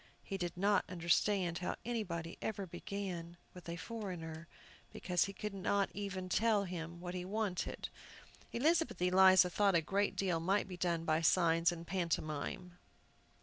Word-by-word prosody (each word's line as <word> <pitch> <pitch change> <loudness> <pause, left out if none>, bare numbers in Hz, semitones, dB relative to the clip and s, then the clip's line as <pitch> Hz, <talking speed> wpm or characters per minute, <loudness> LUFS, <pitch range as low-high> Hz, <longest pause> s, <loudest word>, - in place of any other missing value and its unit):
He 195 - -5
did 175 -2 -3
not 200 +2 +3
understand 175 +1 +1
how 180 - -2
anybody 175 -9 -3
ever 200 -3 -3
began 175 -1 -5 0.2
with 180 -2 -10
a 170 - -3
foreigner, 170 -6 -6 0.4
because 180 -1 +1
he 195 - -5
could 210 +1 -5
not 195 +1 0
even 195 -2 -4
tell 215 +1 +3
him 170 -2 -6
what 175 0 -5
he 180 -1 -3
wanted. 200 -1 -2 0.6
Elizabeth 320 - +2
Eliza 185 0 +6
thought 200 0 +3
a 170 - +5
great 200 +5 0
deal 180 -4 0
might 195 +5 +1
be 185 - -6
done 170 -2 -1
by 155 0 +2
signs 165 0 +4
and 170 -1 -7
pantomime. 170 0 -3
180 Hz, 150 wpm, -35 LUFS, 170-200 Hz, 0.6 s, Eliza